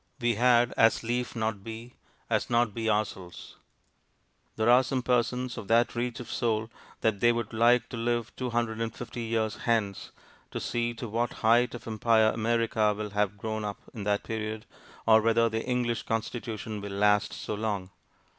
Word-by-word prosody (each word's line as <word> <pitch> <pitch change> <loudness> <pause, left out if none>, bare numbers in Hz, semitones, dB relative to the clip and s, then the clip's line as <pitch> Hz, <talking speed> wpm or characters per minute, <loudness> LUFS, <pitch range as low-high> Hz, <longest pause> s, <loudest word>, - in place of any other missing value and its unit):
We 120 -1 +2
had 120 +1 +4
as 115 +1 +4
lief 120 +2 -2
not 110 -3 -2
be, 115 +2 -8 0.3
as - - 0
not 120 -2 +2
be 115 0 -1
ourselves. 100 -4 -3 1.0
There 110 +1 0
are 125 +2 +7
some 130 -1 -2
persons 125 0 0
of 105 - -8
that 115 +2 +3
reach 120 -1 -3
of 125 - -8
soul 110 -1 -1 0.3
that 110 -3 +1
they 120 +2 +5
would 115 -2 -3
like 120 +2 +4
to 125 - -6
live 120 0 -1
two 130 -1 -3
hundred 115 -1 -1
and 115 0 -1
fifty 120 0 -6
years 110 -2 -1
hence, 110 -5 0 0.4
to - - -4
see 120 0 -2
to 120 - -6
what 115 +2 -1
height 120 +2 +4
of 120 - -9
empire 110 0 +3
America 115 -2 +1
will 105 -1 -4
have 105 0 0
grown 110 +1 -3
up 105 -1 -4 0.2
in 110 - -6
that 100 -1 +1
period, 110 -1 -4 0.4
or 110 0 +6
whether 115 +1 +3
the 110 0 -2
English 125 -2 -1
constitution 110 -2 -4
will 100 -1 -6
last 105 +1 +3
so - - -5
long. 100 -3 -3
115 Hz, 180 wpm, -28 LUFS, 110-120 Hz, 1.0 s, are